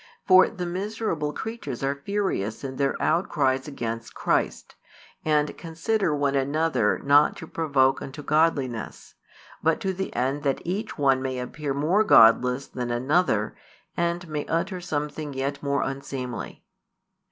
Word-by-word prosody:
For 185 0 +7
the 180 - -5
miserable 185 -4 -2
creatures 150 - -6
are 140 +1 -1
furious 190 - -2
in 130 -1 -5
their 140 0 0
outcries 140 -6 +1
against 115 -5 -5
Christ, - - -1 0.5
and 150 -1 +1
consider 165 +1 -1
one 140 -1 +1
another 140 -4 +1
not 145 +1 +5
to - - -8
provoke 140 -5 +1
unto 140 +2 -7
godliness, 145 -7 0 0.5
but 160 0 +2
to 190 -3 -1
the 190 +1 -4
end 135 +3 0
that 140 -2 -1
each 200 +6 -3
one 135 -3 +3
may 130 -1 -3
appear 135 +3 -4
more 170 +9 +3
godless 125 - +5
than 125 -1 -5
another, 120 - +1 0.4
and 170 0 -1
may 150 -2 -3
utter 180 +3 -1
something 150 -2 -4
yet 140 +1 -2
more 140 0 0
unseemly. 135 -2 -5
145 Hz, 140 wpm, -25 LUFS, 135-170 Hz, 0.5 s, For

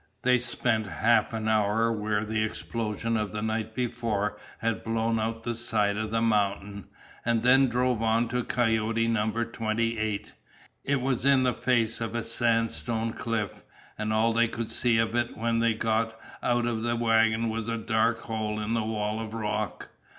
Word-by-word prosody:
They 125 0 +4
spent 120 -3 0
half 110 +5 +2
an 110 -1 -3
hour 110 +1 +2
where 105 -1 -1
the 110 0 0
explosion 115 0 -2
of 105 -3 -1
the 105 0 -3
night 110 0 -2
before 115 -4 -1 0.2
had 115 -1 -2
blown 115 0 0
out 115 +1 -2
the 120 - -2
side 110 -3 0
of 110 0 -2
the 115 +1 0
mountain, 100 -2 0 0.4
and 115 -1 +1
then 135 +2 +6
drove 125 -1 +1
on 115 +1 +2
to 125 +1 -1
Coyote 115 -1 +1
Number 115 +1 0
Twenty 115 0 -1
eight. 110 -2 -3 0.5
It 140 -1 0
was 130 -2 0
in 135 -1 +5
the 125 -1 +2
face 115 -3 0
of 115 0 -3
a 120 - -1
sandstone 115 0 0
cliff, 115 -4 -3 0.3
and 110 0 -2
all 110 +1 +3
they 115 +1 +3
could 115 0 -5
see 120 -2 +2
of 115 0 +1
it 120 0 -1
when 115 +1 0
they 115 -1 +2
got 110 0 0 0.2
out 120 -1 +1
of 115 -2 -1
the 120 +1 0
wagon 115 -1 +3
was 110 0 -3
a 115 0 -1
dark 115 0 +1
hole 110 -2 -3
in 105 +1 -2
the 115 - +1
wall 110 0 -2
of 110 0 -5
rock. 105 -2 -3
115 Hz, 180 wpm, -27 LUFS, 110-115 Hz, 0.5 s, then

